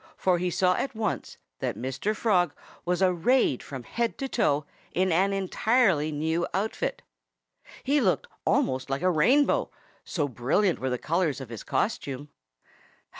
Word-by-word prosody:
For 180 -2 +2
he 180 +1 0
saw 180 +1 +2
at 270 - -3
once 215 -4 -3 0.2
that - - -2
Mr. 135 - -2
Frog 180 -8 +2 0.3
was 180 +2 +1
arrayed 185 - +3
from 130 -3 -7
head 235 - -2
to 270 - -3
foot 150 - +1 0.3
in 185 +1 +2
an 190 +4 +3
entirely 195 - +2
new 160 +3 -1
outfit. 205 +3 -2 0.8
He 285 +2 +2
looked 190 -6 +1 0.2
almost 130 0 +1
like 135 +5 -2
a 185 - +4
rainbow, 255 - +3 0.3
so 150 -5 -1
brilliant 140 - +1
were 130 - -1
the 125 - -1
colors 160 0 0
of 135 -3 -8
his 115 -2 -7
costume. 145 - -2
180 Hz, 150 wpm, -27 LUFS, 145-210 Hz, 0.8 s, a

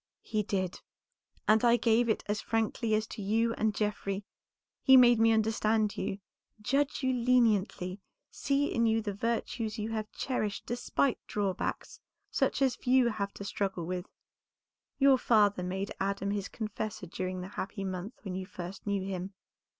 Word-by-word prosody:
"He 215 - -1
did, 190 -3 -2 0.7
and 215 +2 +5
I 240 0 +5
gave 235 0 +3
it 220 - +1
as 210 +1 -1
frankly 225 0 0
as 215 0 0
to 215 - -8
you 225 +3 +1
and 215 -2 0
Geoffrey. 210 -2 -2 0.6
He 265 -1 +8
made 240 -2 +7
me 225 0 +5
understand 220 -1 +2
you, 195 - -3 0.4
judge 275 +6 0
you 260 0 +2
leniently, 220 -6 +2 0.3
see 280 0 0
in 230 0 +2
you 225 0 +2
the 205 -2 -3
virtues 225 +1 -2
you 215 +1 -3
have 215 -1 -3
cherished 215 -6 -2
despite 245 +2 0
drawbacks 200 -3 -2 0.3
such - - +1
as 260 -2 +2
few 255 -1 +3
have 200 -3 -3
to - - -7
struggle 195 -3 -2
with. 180 +2 -4 0.9
Your 275 -2 +5
father 205 -5 +3
made 190 +2 -3
Adam 200 0 -1
his 200 -2 -2
confessor 215 -3 -5
during 185 +1 -4
the 185 - -7
happy 195 0 -5
month 190 +3 -4
when 190 -3 -5
you 185 0 -4
first 185 +2 -8
knew 200 -1 0
him. 190 0 -5
215 Hz, 160 wpm, -30 LUFS, 195-230 Hz, 0.9 s, He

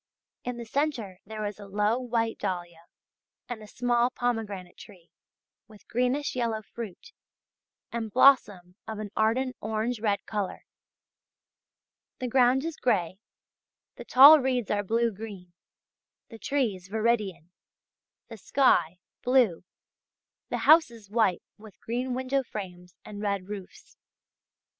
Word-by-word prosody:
In 245 -1 -4
the 235 - -7
centre 230 -8 -2
there 215 0 -5
is 205 0 -5
a 200 - -10
low 210 +4 +1
white 230 -3 -1
dahlia 175 -4 -4 0.6
and 240 -3 -6
a 215 - -11
small 240 +1 +1
pomegranate 220 -8 -3
tree 180 -5 -15 0.6
with 215 -3 -18
greenish 250 +5 0
yellow 230 -3 -1
fruit, 230 - -9 0.8
and 230 -2 -4
blossom 205 -8 +4
of 220 - -5
an 210 -1 -6
ardent 250 +4 +1
orange 220 +2 -2
red 205 -2 -1
colour. 205 -3 -4 1.5
The 255 - -3
ground 255 +3 +3
is 330 -2 -4
grey, 190 -6 0 0.8
the - - -9
tall 285 +4 +9
reeds 255 -4 -1
are 205 -1 +1
blue 230 +3 +1
green, 195 -4 -10 0.8
the 225 - -11
trees 220 -11 -2
viridian, 210 -6 -1 0.8
the 225 - -10
sky 185 - +2 0.2
blue, 245 -10 +2 0.9
the - - -3
houses 235 -11 +4
white 215 -5 +2 0.2
with 215 -2 -15
green 245 +2 -3
window 260 +2 0
frames 180 -7 -8
and 205 -1 -8
red 200 -2 -2
roofs. 200 -3 -10
220 Hz, 125 wpm, -27 LUFS, 200-245 Hz, 1.5 s, tall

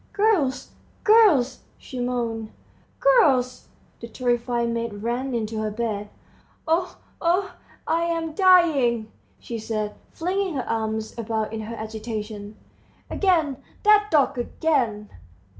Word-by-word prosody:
"Girls, 400 -11 +1 0.3
girls!" 370 - +5 0.2
she 255 - -8
moaned. 235 -3 -2 0.5
"Girls!" 285 - +3 0.3
The 235 - -7
terrified 240 -1 -1
maids 230 -2 -3
ran 240 +5 -2
into 220 -1 -2
her 215 - -1
bedroom. 210 -2 -3 0.6
"Oh, 340 +3 0 0.2
oh, 365 +3 +1 0.3
I 335 +1 +1
am 330 -2 -2
dying!" 300 - +4 0.3
she 230 -1 -6
said, 215 -1 -3 0.2
flinging 370 0 -2
her 260 - -3
arms 220 -1 -2
about 220 -1 -2
in 220 - -3
her 225 +2 -6
agitation. 215 -1 -6 0.6
"Again, 325 -9 +2 0.3
that 420 0 +5
dog, 280 -5 +2
again! 240 -6 -1
245 Hz, 115 wpm, -24 LUFS, 220-330 Hz, 0.6 s, girls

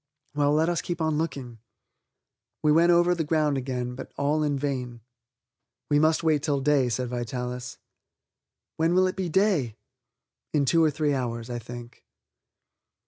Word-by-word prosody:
"Well, 145 0 +2
let 155 +2 +2
us 175 -2 0
keep 175 -1 -4
on 160 -2 0
looking." 130 -7 -4 1.0
We 150 - +4
went 170 +3 +5
over 175 +1 +4
the 170 -2 -1
ground 150 -2 +1
again, 125 -2 -3
but 130 +1 -9
all 145 +2 +1
in 145 -2 0
vain. 125 -4 -3 0.9
"We 145 - +5
must 155 +2 +2
wait 155 -3 +2
till 145 -1 0
day," 135 -2 +2
said 125 +2 -2
Vitalis. 125 +1 -4 1.0
"When 165 +2 +2
will 185 0 +5
it 185 - -1
be 185 -2 -2
day?" 165 - +1 0.8
"In 145 -2 +2
two 165 +4 +3
or 155 - +4
three 150 0 0
hours, 120 -2 -3
I 120 - -3
think." 120 0 -10
145 Hz, 160 wpm, -26 LUFS, 125-160 Hz, 1.0 s, went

